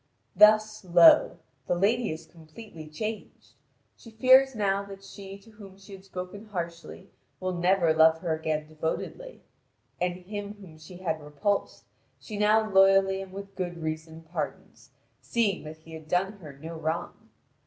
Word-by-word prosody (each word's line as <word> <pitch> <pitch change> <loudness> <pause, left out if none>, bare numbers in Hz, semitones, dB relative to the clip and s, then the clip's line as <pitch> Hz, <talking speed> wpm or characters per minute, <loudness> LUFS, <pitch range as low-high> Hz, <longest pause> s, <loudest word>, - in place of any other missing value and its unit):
Thus, 215 +1 +5
lo! 175 -2 +6 0.3
the - - +1
lady 220 +7 +1
is 160 +1 -7
completely 160 +1 -13
changed: 215 +8 -7 0.4
she 230 - -15
fears 260 +3 +5
now 200 -2 +1
that 195 0 -11
she 195 0 -10
to 225 +3 -19
whom 200 -3 -14
she 195 +1 -14
had 190 -1 -11
spoken 190 +2 -8
harshly 175 -1 -7 0.3
will 185 0 -2
never 175 -1 +2
love 160 0 +5
her 170 -3 -1
again 155 -1 -2
devotedly; 160 - -5 0.6
and 180 0 0
him 205 +3 -7
whom 180 -6 -14
she 175 +3 -12
had 160 -4 -3
repulsed, 150 +8 -2 0.4
she 215 - -8
now 215 +1 +3
loyally 195 -1 +4
and 190 -1 -9
with 195 +1 -9
good 180 -2 -4
reason 160 +1 -5
pardons, 165 +2 -6 0.3
seeing 210 -8 0
that 155 +1 -8
he 160 +1 -15
had 160 -1 -10
done 180 +4 +1
her 155 -5 -10
no 160 +4 -9
wrong. 160 +1 -4
185 Hz, 155 wpm, -27 LUFS, 160-205 Hz, 0.6 s, lo